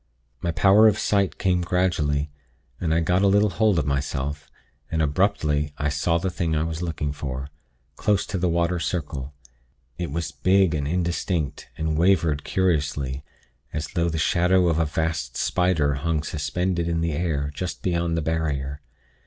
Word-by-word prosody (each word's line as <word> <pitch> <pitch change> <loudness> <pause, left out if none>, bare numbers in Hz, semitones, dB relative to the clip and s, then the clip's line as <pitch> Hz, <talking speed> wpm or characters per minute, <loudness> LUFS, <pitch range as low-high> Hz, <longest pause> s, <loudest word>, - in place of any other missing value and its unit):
"My 85 - -1
power 100 +6 +6
of 105 -1 +3
sight 100 -3 +1
came 90 -2 +1
gradually, 80 -5 0 0.5
and 85 -3 -1
I 80 +1 +3
got 90 +3 +2
a 100 - +4
little 100 +1 +4
hold 100 +2 +2
of 75 - +1
myself; 70 0 -2 0.4
and 80 - -1
abruptly 75 -2 +1
I 75 -1 0
saw 80 +4 +1
the 90 +2 -2
thing 85 -2 -1
I 75 - +1
was 80 0 -3
looking 80 -4 -2
for, 70 -1 -5 0.5
close 105 -2 +1
to 95 - -3
the 90 0 +1
'water 85 +1 +1
circle.' 75 -3 -3 0.6
It 85 -3 -2
was 80 +2 -3
big 95 +1 +3
and 70 -2 -1
indistinct, 85 -3 -2
and 80 0 -1
wavered 85 -5 +3
curiously, 70 -7 0 0.5
as 75 0 -3
though 85 -2 0
the 80 - -3
shadow 90 +3 +3
of 80 -1 +1
a 80 - +3
vast 80 +1 -2
spider 90 -6 +1
hung 80 +2 -1
suspended 85 +3 -1
in 85 -1 0
the 85 0 0
air, 75 -3 -1
just 90 +4 -5
beyond 85 -2 0
the 80 - -1
barrier. 75 -3 -2
80 Hz, 170 wpm, -24 LUFS, 75-90 Hz, 0.6 s, power